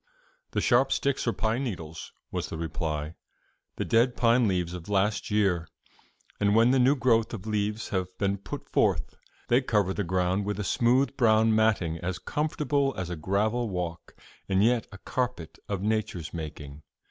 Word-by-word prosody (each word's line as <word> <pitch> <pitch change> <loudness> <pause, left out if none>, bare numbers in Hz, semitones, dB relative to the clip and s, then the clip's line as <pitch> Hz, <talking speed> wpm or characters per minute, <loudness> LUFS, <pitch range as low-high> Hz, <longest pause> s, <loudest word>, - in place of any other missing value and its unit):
"The - - +1
sharp 130 +2 +3
sticks 140 -2 0
are - - +4
pine 115 +4 -1
needles," 80 - -6 0.2
was - - -3
the - - -5
reply 80 -2 -3 0.6
"the - - -2
dead 120 +2 +2
pine 120 0 +4
leaves 90 -3 -1
of 90 +1 -8
last 100 +1 +1
year; 95 -6 +1 0.7
and 100 0 +3
when 115 +2 +5
the 135 - +3
new 130 +3 +5
growth 115 -3 +2
of 100 -2 -9
leaves 105 0 -2
have 95 -3 -1
been 100 0 0
put - - -7
forth, - - +1 0.3
they 120 +2 +4
cover 105 -7 +1
the 100 - -2
ground 90 +2 0
with 105 0 -2
a - - -1
smooth 125 +7 +2
brown 110 -3 +4
matting 100 -7 +2
as 90 0 -3
comfortable 145 -2 -1
as 90 -2 -4
a - - -2
gravel 105 +8 0
walk, 85 -3 -5 0.3
and 95 +1 +3
yet 120 0 +2
a 95 - -9
carpet 125 -7 -3
of 100 -2 -2
Nature's 105 -8 -2
making. 75 -3 -7
105 Hz, 170 wpm, -27 LUFS, 90-120 Hz, 0.7 s, when